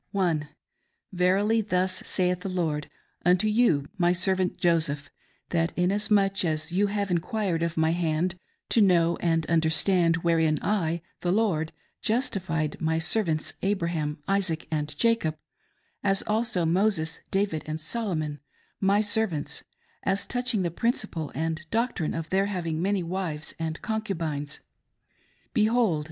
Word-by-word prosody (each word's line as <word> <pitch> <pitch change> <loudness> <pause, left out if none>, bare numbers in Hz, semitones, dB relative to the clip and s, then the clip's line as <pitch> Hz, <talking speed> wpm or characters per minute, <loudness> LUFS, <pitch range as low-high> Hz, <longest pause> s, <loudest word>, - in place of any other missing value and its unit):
Verily, 195 +5 +3
thus 185 -2 0
saith 180 -1 +1
the 195 - -5
Lord, 160 -5 -1 0.3
unto 180 +4 +4
you, 210 - +3
my 175 0 +4
servant 185 0 +1
Joseph, 155 -5 +1 0.4
that 165 0 0
inasmuch 195 +1 +2
ail 160 -3 +1
you 195 +4 +2
have 200 -1 -2
inquired 180 0 0
of 170 0 -1
my 160 0 +3
hand, 170 +1 0 0.4
to 230 - +4
know 170 -4 +4
and 165 -2 +1
understand 165 +1 +3
wherein 160 -2 +3
I, 170 -5 0 0.2
the 175 - 0
Lord, 185 -7 +1 0.3
justified 190 - 0
my 160 0 +1
servants, 165 -2 0
Abraham, 170 -6 -1
Isaac, 190 -5 0
and 150 -1 -2
Jacob; 230 -10 +2 0.7
as 195 -1 +2
also 215 -5 0
Moses, 165 -2 +1
David, 195 -5 0
and 155 0 -3
Solomon, 155 -5 -3 0.4
my 200 +1 +3
servants, 205 -7 0 0.4
aS 195 +1 0
touching 245 -5 0
the 170 - -1
principle 190 - -1
and 160 +2 -1
doctrine 230 -8 0
of 165 -1 -5
their 195 +1 +2
having 170 -5 -2
many 195 0 +1
wives 165 -3 -3
and 160 -1 -3
concubines: 165 -10 -3 0.9
Behold 225 -1 +3
180 Hz, 130 wpm, -27 LUFS, 160-200 Hz, 0.9 s, unto